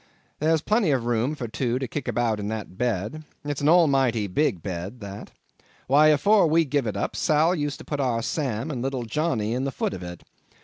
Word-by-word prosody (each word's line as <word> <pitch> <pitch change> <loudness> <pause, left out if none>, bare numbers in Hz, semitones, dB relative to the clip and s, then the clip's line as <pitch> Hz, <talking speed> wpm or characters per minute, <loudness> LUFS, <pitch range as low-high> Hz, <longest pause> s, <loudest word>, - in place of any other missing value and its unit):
There's 160 +1 +2
plenty 215 -4 +2
of 130 -5 +1
room 120 +5 0
for 125 -5 -5
two 120 +2 -1
to 130 0 -3
kick 145 +1 -5
about 115 -3 0
in 100 - -3
that 110 -3 -5
bed; 120 +6 -2 0.2
it's 145 -1 -3
an 145 - +3
almighty 135 -10 +4
big 95 - 0
bed 95 +5 -5
that. 100 0 -8 0.6
Why, 145 +4 +5
afore 190 +6 +4
we 165 +1 +3
give 140 -3 0
it 105 - -3
up, 100 - -2
Sal 155 +3 +3
used 145 -5 -2
to - - -12
put 145 - -3
our 120 -4 0
Sam 130 -1 -2
and 125 -4 -4
little 130 -1 -2
Johnny 115 -3 -1
in 125 +2 -1
the 135 - -1
foot - - -2
of 95 - -7
it. 90 -1 -8
130 Hz, 215 wpm, -25 LUFS, 110-150 Hz, 0.6 s, Why